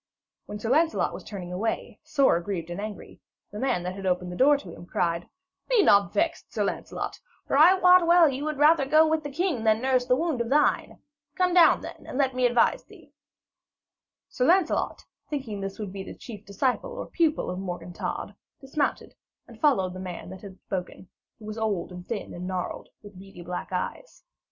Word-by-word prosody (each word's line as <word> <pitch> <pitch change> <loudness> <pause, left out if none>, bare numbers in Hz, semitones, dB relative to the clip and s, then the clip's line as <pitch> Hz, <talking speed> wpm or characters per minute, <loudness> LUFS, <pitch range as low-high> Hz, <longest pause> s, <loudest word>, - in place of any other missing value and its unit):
When 210 - -6
Sir 225 +3 -3
Lancelot 320 +4 +2
was - - -8
turning 180 -4 -7
away, 220 +5 -3
sore 275 - +3
aggrieved 175 -1 -4
and 175 - -4
angry, 210 -1 -8 0.3
the 210 - -7
man 250 -8 0
that 180 +1 -3
had 195 0 -5
opened 180 0 -1
the - - -6
door 285 +7 +5
to 185 -11 -10
him 175 - -12
cried: 170 0 -1 0.4
'Be 480 -5 +4
not 200 - +5
vexed, 330 +1 -1
Sir - - -1
Lancelot, - - -4 0.3
for - - -1
I 325 +6 +7
wot 360 -2 +6
well 340 -1 +7
you 275 0 -2
would 305 -2 -2
rather 295 -1 +4
go 310 +3 +5
with 315 0 +1
the 290 - -6
king 300 -4 -1
than 220 -1 +3
nurse 255 0 +1
that 250 - +4
wound 310 -3 -1
of 235 - -3
thine. 295 +2 +2 0.4
Come 365 -1 +2
down, 345 -2 +6
then, - - -10
and - - -5
let 270 -2 +2
me 250 0 +3
advise 240 -1 +2
thee.' - - -18 1.1
Sir 250 - -1
Lancelot, 360 +2 +1 0.2
thinking 250 -9 -4
this 195 0 -5
would 205 -3 -6
be 195 - -5
the 190 - -8
chief 215 -3 -10
disciple 250 - -1
or - - -5
pupil 320 - 0
of 180 - -5
Morgan 175 -2 -6
Todd, - - -4 0.3
dismounted, 285 +2 -2 0.3
and - - -15
followed 195 - +2
the 185 - -8
man 180 -1 -7
that 190 - -10
had 195 -2 -11
spoken, 185 -1 -6 0.3
who 215 - -13
was 215 +1 -6
old 205 -6 -1
and 180 0 -10
thin 225 -3 -5
and 180 +1 -6
gnarled, 185 -1 -4
with 205 -3 -12
beady 190 -2 -12
black 180 +2 -5
eyes. 185 - -5
225 Hz, 205 wpm, -26 LUFS, 185-295 Hz, 1.1 s, I